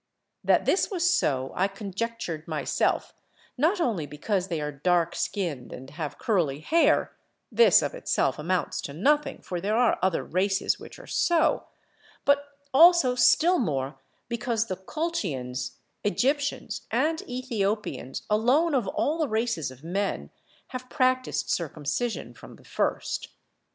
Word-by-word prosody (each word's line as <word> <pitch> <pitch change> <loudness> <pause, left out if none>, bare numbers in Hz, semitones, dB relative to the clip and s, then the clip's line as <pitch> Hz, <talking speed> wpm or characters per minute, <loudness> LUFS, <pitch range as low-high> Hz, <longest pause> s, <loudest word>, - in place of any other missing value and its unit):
That - - +3
this 385 - +2
was 355 -4 0
so 135 - +1
I 190 - +2
conjectured 195 -4 -5
myself 155 -2 0 0.4
not 325 +9 +2
only 210 - 0
because 180 +6 -2
they 170 -4 -2
are 150 0 -3
dark 170 +4 +1
skinned 175 -8 -3
and 130 +2 -9
have 150 -1 -5
curly 165 - 0
hair 325 - +2 0.4
(this 475 - +6
of - - -2
itself - - 0
amounts 175 +4 -1
to 140 - -6
nothing, 295 - +1
for 175 -2 -4
there 210 +4 0
are 245 0 +3
other 185 -2 +1
races 190 +2 0
which - - -11
are - - -12
so), 335 -2 +2 0.6
but 285 0 +4 0.3
also 330 -3 +7
still 335 +8 +4
more 140 - -2 0.3
because 235 -1 -1
the 190 -5 -3
Colchians, 185 - -3 0.3
Egyptians, 280 +7 -1
and 320 +1 +1
Ethiopians 215 - -2
alone 255 +10 +3
of 245 -7 +1
all 305 +11 0
the 305 -4 0
races 220 - -1
of 130 +2 -14
men 180 - -2 0.4
have 255 0 -7
practised 255 -2 +1
circumcision 165 - -2
from - - -13
the - - -20
first. - - -2
205 Hz, 140 wpm, -27 LUFS, 165-265 Hz, 0.6 s, also